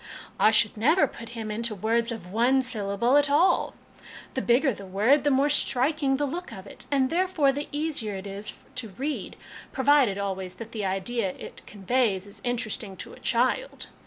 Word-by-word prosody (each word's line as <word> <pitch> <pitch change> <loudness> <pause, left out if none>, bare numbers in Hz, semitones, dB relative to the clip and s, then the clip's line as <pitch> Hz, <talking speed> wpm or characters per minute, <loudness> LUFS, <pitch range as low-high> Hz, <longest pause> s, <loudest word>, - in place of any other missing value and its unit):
" - - -24
I - - +6
should 215 -1 +4
never 310 - +4
put 230 - -9
him 220 -1 -4
into 225 0 -2
words 230 +4 0
of 185 -6 -7
one 250 +5 +3
syllable 230 +1 +1
at 290 0 +3
all. 310 +6 +3 0.6
The 260 - -1
bigger 255 +3 +3
the 200 - -10
wdrd, 210 +10 +3
the 290 - +1
more 275 +1 +3
striking 280 0 +2
the 290 - 0
look 345 +6 -5
of 190 0 -9
it, - - -8
and, 270 -2 +1
therefore, 345 -5 +2
the 290 +2 -4
easier 290 -9 -3
it 190 +1 -7
is 200 +1 -6 0.2
to 235 -4 -4
read, 275 +10 -4 0.4
provided 265 -6 +3
always 190 -2 -4
that 230 0 -9
the 215 -3 -3
idea 195 +1 -2
it - - -10
conveys 205 -1 0
is 200 - -11
interesting 230 -4 -2
to - - -8
a - - -13
child. 255 - 0
235 Hz, 190 wpm, -26 LUFS, 205-280 Hz, 0.6 s, I